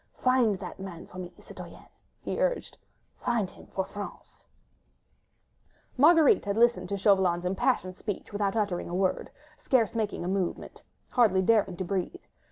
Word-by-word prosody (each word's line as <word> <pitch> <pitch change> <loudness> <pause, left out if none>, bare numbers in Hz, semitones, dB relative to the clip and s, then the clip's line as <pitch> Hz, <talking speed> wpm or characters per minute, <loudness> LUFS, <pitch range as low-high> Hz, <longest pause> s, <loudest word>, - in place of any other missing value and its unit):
Find 255 -5 +3
that 185 - -8
man 185 -3 -8
for 185 - -11
me, 180 -1 -6
citoyenne!" - - -11 0.4
he - - -3
urged, - - -1 0.4
"find 235 -5 0
him - - -16
for 190 - -3
France!" 205 -1 -9 1.5
Marguerite 310 0 +5
had 200 +1 -1
listened 240 +1 +3
to 200 - -1
Chauvelin's 190 -3 +3
impassioned 185 0 0
speech 205 -1 -6
without 205 0 0
uttering 200 -6 -1
a 175 - -3
word, 185 0 0 0.3
scarce 235 -5 +2
making 215 -6 -2
a - - -2
movement, 190 -1 -3 0.3
hardly 205 -7 +4
daring 205 -4 +2
to 185 - -2
breathe. 195 - -3
200 Hz, 150 wpm, -28 LUFS, 185-230 Hz, 1.5 s, Marguerite